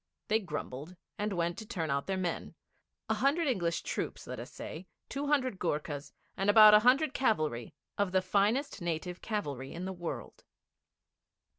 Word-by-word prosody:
They 220 +1 +4
grumbled, 170 - -6 0.2
and 210 +1 -1
went 170 -1 -1
to 220 - -7
turn 160 -7 -2
out 140 0 -1
their 190 -1 0
men 180 -2 -3 0.5
a - - +2
hundred 300 +4 +2
English 175 -10 0
troops, - - -3
let - - -6
us - - -8
say, 180 +4 -8 0.2
two 280 +1 -3
hundred 260 -8 +1
Goorkhas, 150 -3 -2 0.2
and 195 +1 0
about 215 0 +9
a 210 - +9
hundred 260 +6 +4
cavalry 155 - 0 0.2
of 200 -2 +2
the 185 0 +2
finest 205 +7 +1
native 175 +1 -3
cavalry 145 - -3
in 175 +2 -5
the 190 - -3
world. 175 -2 -6
185 Hz, 165 wpm, -32 LUFS, 165-220 Hz, 0.5 s, about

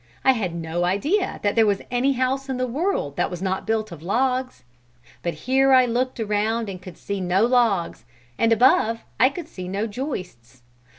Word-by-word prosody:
I 265 - +6
had 195 -9 -2
no 165 +1 -2
idea 290 - 0
that 205 -1 +2
there 225 -2 +4
was 200 -1 0
any 255 +3 +2
house 265 +2 -1
in 260 - -2
the 255 - 0
world 255 - -2
that - - +1
was 180 - -6
not 190 +2 -2
built 220 -2 -1
of 165 -3 -9
logs. 255 +7 -1 0.6
But 170 - -3
here 265 +1 +4
I 255 -1 +6
looked 250 +1 -1
around 220 +1 0
and 185 -2 -7
could 180 -1 -11
see 200 -1 -4
no 185 +4 +2
logs, 235 -8 +1 0.3
and 230 - +2
above 230 -1 +4 0.2
I 255 - +6
could 320 +3 -7
see 185 - -8
no 200 +4 -2
joists. 180 - -7
225 Hz, 190 wpm, -23 LUFS, 185-255 Hz, 0.6 s, I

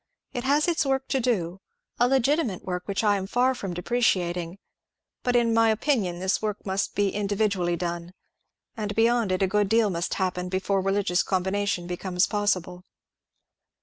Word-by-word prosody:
It 245 +1 -4
has 290 +4 +3
its 340 -2 +2
work 270 -1 0
to 270 - +1
do 195 -7 -1 0.2
— - - -40
a 245 - +5
legitimate 270 - +1
work, 180 -1 -4
which 200 +2 -1
I 205 -1 +3
am 190 0 -4
far 250 +5 +2
from 195 -8 -5
depreciating 180 -4 0 0.3
— - - -63
but, 245 -1 +1
in 235 -1 +3
my 225 0 +4
opinion, 220 -6 0
this 190 +2 0
work 210 -1 -3
must 195 0 -2
be 205 -1 +2
individually 200 -3 0
done; 175 +1 -4 0.6
and, 210 -3 -4
be 225 - +4
yond 235 -4 +2
it, 185 +1 +1
a - - +3
good 205 +1 +1
deal 220 -2 +3
must 170 0 -2
happen 180 -1 -2
before 190 +1 0
religious 195 -1 +1
combina 190 +2 -1
tion 175 -3 -1
becomes 180 +1 0
possible." 185 -4 -1
200 Hz, 180 wpm, -26 LUFS, 180-230 Hz, 0.6 s, a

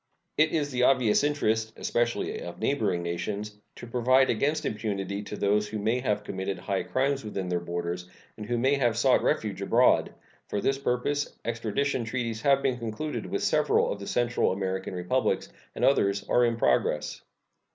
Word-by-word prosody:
It 155 +1 +3
is 145 -3 0
the 125 -1 -1
obvious 125 -2 +4
interest, 110 -7 0
especially 120 0 -1
of 85 0 -7
neighboring 110 -7 0
nations, 100 +5 -4 0.2
to - - -9
provide 125 +2 +3
against 150 +7 0
impunity 100 -2 -3
to 105 - -7
those 105 +1 +1
who 110 +1 -4
may 110 +4 0
have 105 -5 -1
committed 95 -1 -4
high 100 -2 -2
crimes 135 0 0
within 100 -3 -4
their 90 -1 0
borders 85 +1 -4 0.3
and 105 -1 -8
who 120 +1 0
may 130 +4 +2
have 120 -4 +1
sought 130 +2 +4
refuge 100 -3 -1
abroad. 120 +5 +3 0.4
For 105 - -2
this 135 +6 0
purpose 140 +3 -1
extradition 115 +3 -1
treaties 115 -1 -3
have 140 +1 +3
been 130 -2 0
concluded 115 +7 -4
with - - -2
several - - +2
of 100 - -4
the 100 - -7
Central 120 -1 +1
American 95 0 -3
Republics, 90 0 0 0.3
and - - +1
others 100 -7 +2
are 125 - +4
in 115 -1 0
progress. - - +1
110 Hz, 170 wpm, -27 LUFS, 100-130 Hz, 0.4 s, obvious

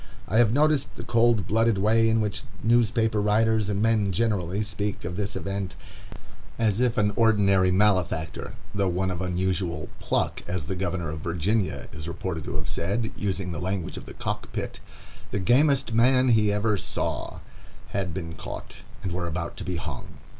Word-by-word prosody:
I 110 - +3
have 115 -3 +5
noticed 150 +1 +2
the - - -7
cold 115 -4 +3
blooded 115 +1 +2
way 115 +3 +4
in 110 0 +3
which 105 -2 -1 0.2
newspaper 115 -2 +3
writers 110 0 +2
and 100 0 0
men 110 -3 +3
generally 100 -1 0
speak 105 -2 -3
of 90 0 -4
this 100 +1 -3
event, 100 -1 -3 0.8
as 110 -1 +1
if 125 -1 +2
an 105 -1 +2
ordinary 100 -5 +4
malefactor, 90 -5 +1 0.2
though 100 -1 +1
one 95 +1 0
of 90 -1 -4
unusual 90 -2 -1
"pluck,"—as 90 -4 -1
the 95 - -3
Governor 90 -3 -2
of 80 - -5
Virginia 90 +6 -1
is 80 +2 -7
reported 85 -2 -4
to - - -4
have 75 -1 -3
said, 105 +6 -1
using 95 -2 -2
the 80 - -4
language 95 -1 -2
of - - -8
the - - -9
cock - - -4
pit, - - -4 0.5
"the - - -2
gamest 135 +5 +3
man 125 +3 +4
he 110 -3 +4
ever 105 +1 +1
saw,"—had 95 0 -4
been 85 -1 -5
caught, - - -8 0.3
and 95 - -2
were 90 -1 -2
about 85 0 -4
to - - -5
be 90 - -3
hung. 80 -5 -6
100 Hz, 170 wpm, -26 LUFS, 90-110 Hz, 0.8 s, have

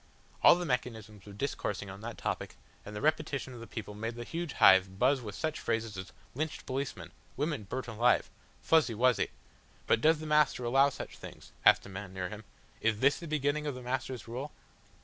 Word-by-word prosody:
All - - +9
the 175 0 -3
mechanisms 110 - -3
were - - -9
discoursing 105 -3 -3
upon 95 +1 -9
that 115 +1 -6
topic, - - -3 0.3
and 105 - -9
the 105 - -4
repetition 150 -4 0
of 120 - -9
the 115 - -9
people 105 -2 -6
made 115 +3 -4
the 120 - -5
huge 165 +4 -4
hive 95 0 +6
buzz 130 +4 +3
with 105 -4 -7
such 155 -1 -2
phrases 115 -1 -2
as 95 0 -7 0.2
"Lynched 155 +4 -3
policemen," 135 +1 -4 0.3
"Women 145 -6 -1
burnt 130 +6 -4
alive," 115 +2 +3 0.4
"Fuzzy 155 -8 +3
Wuzzy." 125 +1 +3 0.6
"But 115 - +3
does 160 +3 +5
the 155 - -7
Master 150 -4 +3
allow 135 +4 +4
such - - -8
things?" - - -11
asked - - +6
a - - -9
man 95 0 -7
near 90 -1 -3
him. 105 0 -9 0.4
"Is 110 -1 +1
this 140 +3 +4
the 170 - -7
beginning 150 0 0
of 145 - -2
the 125 - -8
Master's 125 -2 -3
rule?" 130 +5 -5
125 Hz, 200 wpm, -31 LUFS, 105-145 Hz, 0.6 s, All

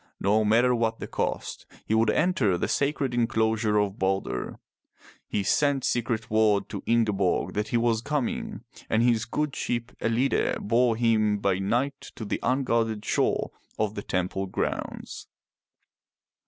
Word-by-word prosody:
No 105 +2 +2
matter 115 +4 +4
what 115 -2 0
the - - -6
cost, - - -3 0.2
he - - -1
would 110 0 +3
enter 130 - +2
the - - -1
sacred 140 -2 0
enclosure 110 -2 +1
of 105 -1 0
Balder. 95 0 -1 0.7
He 100 - -1
sent 140 +4 +2
secret 115 -2 -1
word 110 -2 +3
to 100 -2 -5
Ingeborg 105 -6 +1
that 105 0 -1
he 120 - 0
was 115 -1 +1
coming, 140 -7 -2 0.3
and 110 +1 +2
his 115 -2 +2
good 150 +4 -2
ship 120 0 -2
EUide 115 +4 +1
bore 115 +2 +2
him 110 -3 +2
by 100 -2 0
night 125 +8 -1
to 110 - -6
the - - -2
unguarded 115 -5 0
shore - - 0 0.3
of 105 -1 0
the 100 - -5
temple 95 0 -2
grounds. - - -4
115 Hz, 145 wpm, -26 LUFS, 105-120 Hz, 0.7 s, matter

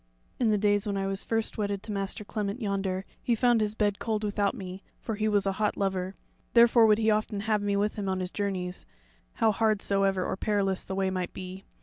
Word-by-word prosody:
In 240 -3 +3
the 210 - +3
days 205 0 +2
when 200 -1 -1
I 195 - -1
was 195 0 -1
first 225 -1 -2
wedded 200 -1 -1
to 215 - -6
Master 195 +1 -2
Clement 205 +2 -3
yonder, 195 -3 -1 0.2
he 240 - +1
found 240 -1 +3
his 210 0 -1
bed 205 -2 +1
cold 220 -2 -1
without 205 0 0
me, 190 -3 -7 0.2
for 225 - -4
he 215 +1 0
was 205 -2 +2
a 195 - +2
hot 210 - +1
lover; 190 -1 -1 0.4
therefore 235 -1 +7
would 210 -1 +5
he 220 0 +3
often 210 -1 0
have 215 -1 +1
me 205 0 0
with 205 +2 0
him 200 -2 -2
on 190 0 -1
his 180 0 -3
journeys, 185 -3 -3 0.5
how 220 - +3
hard 215 0 +2
soever 195 -2 +2
or - - -1
perilous 195 -2 0
the 190 - -5
way 190 -1 +1
might 185 -1 -3
be. 185 +1 -8
205 Hz, 230 wpm, -28 LUFS, 195-215 Hz, 0.5 s, therefore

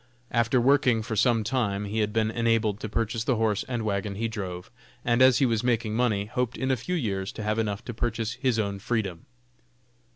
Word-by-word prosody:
After 115 +2 +2
working 125 -3 +3
for 110 0 -4
some 115 0 +3
time 105 -4 -1
he 105 +2 -2
had 105 -1 +1
been 110 0 +1
enabled 115 -3 +1
to 110 - -5
purchase 110 +1 -1
the 130 - +1
horse 110 -2 +1
and 120 -3 -2
wagon 100 -1 -2
he 115 +3 -1
drove, 95 -5 -6 0.3
and 120 +1 +2
as 130 -2 +7
he 135 - +3
was 115 -2 +1
making 115 -3 0
money, 110 -4 +1
hoped 125 +3 -2
in 130 0 0
a - - +3
few 155 +10 -3
years 100 - -2
to 110 - -6
have 110 +1 0
enough 105 -1 -2
to 120 - -5
purchase 115 -1 -2
his 130 -2 0
own 100 -2 -1
freedom. 100 -6 -3
115 Hz, 215 wpm, -27 LUFS, 105-120 Hz, 0.3 s, as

